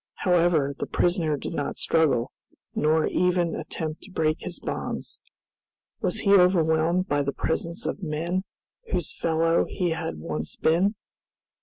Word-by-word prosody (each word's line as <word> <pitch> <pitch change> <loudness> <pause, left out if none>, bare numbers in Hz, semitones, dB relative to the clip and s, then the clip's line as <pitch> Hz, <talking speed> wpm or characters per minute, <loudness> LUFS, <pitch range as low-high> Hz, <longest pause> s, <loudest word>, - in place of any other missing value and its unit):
However, 170 -6 +3
the - - -2
prisoner 170 -4 +1
did - - -5
not 145 - -3
struggle, 155 -8 +2 0.4
nor 155 +1 +2
even 180 -2 +1
attempt 155 -1 -4
to 200 - -13
break 155 -3 0
his 180 - -4
bonds. - - -5 0.8
Was - - 0
he 200 -2 +4
overwhelmed 175 -1 +4
by 145 -3 +1
the 140 0 -1
presence 170 +4 -2
of - - -3
men 170 +3 -2 0.5
whose - - 0
fellow 165 0 +2
he 180 -3 -1
had 160 - -3
once 75 -1 -4
been? 185 +7 +2
165 Hz, 140 wpm, -26 LUFS, 155-180 Hz, 0.8 s, he